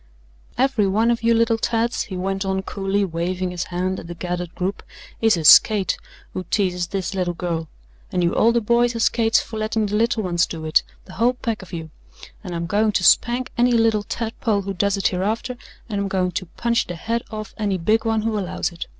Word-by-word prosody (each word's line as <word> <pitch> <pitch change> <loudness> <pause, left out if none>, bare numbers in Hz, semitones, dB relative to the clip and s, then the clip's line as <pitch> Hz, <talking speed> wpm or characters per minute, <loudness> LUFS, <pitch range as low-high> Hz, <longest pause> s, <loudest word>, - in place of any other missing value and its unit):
"Every 255 -6 +2
one 220 +5 +2
of 235 - -1
you 230 0 +3
little 230 0 +2
tads," 230 +1 0
he 190 -4 -6
went 195 +1 -2
on 190 0 -1
coolly, 195 +1 -1
waving 180 +1 -2
his 175 0 -3
hand 185 +1 -2
at - - -10
the 175 - -7
gathered 180 0 -4
group, 190 +2 -2 0.4
"is 225 -4 +4
a 165 - -3
skate 195 +3 +6 0.4
who 185 - -4
teases 180 -2 0
this 195 +2 -3
little 180 -2 -1
girl. 165 -2 -3 0.4
And 180 -1 0
you 170 - +2
older 235 +1 +3
boys 235 +2 +2
are - - -2
skates 225 0 +3
for 220 - -7
letting 215 0 0
the 205 0 -2
little 225 0 +1
ones 175 -1 +1
do 160 -2 -6
it, 155 - +4 0.2
the 185 - -12
whole 235 +6 +2
pack 230 -3 -3
of 190 - -13
you 160 -3 -6 0.5
and 180 -3 -5
I'm 170 0 -2
going 210 +4 +1
to 185 - +1
spank 240 +6 +3
any 245 0 +4
little 225 -2 +3
tadpole 220 -1 -2
who 195 0 -4
does 200 +2 0
it 195 - +2
hereafter, 215 +7 -2 0.3
and 205 -3 -2
I'm 200 - -1
going 185 -1 0
to 185 0 -4
punch 235 +6 -1
the 175 - -5
head 230 +7 -2
off 215 -2 -7
any 200 -3 0
big 215 +6 +1
one 225 -1 0
who 220 -1 0
allows 185 -2 -2
it. 170 - -7
200 Hz, 220 wpm, -22 LUFS, 180-225 Hz, 0.5 s, skate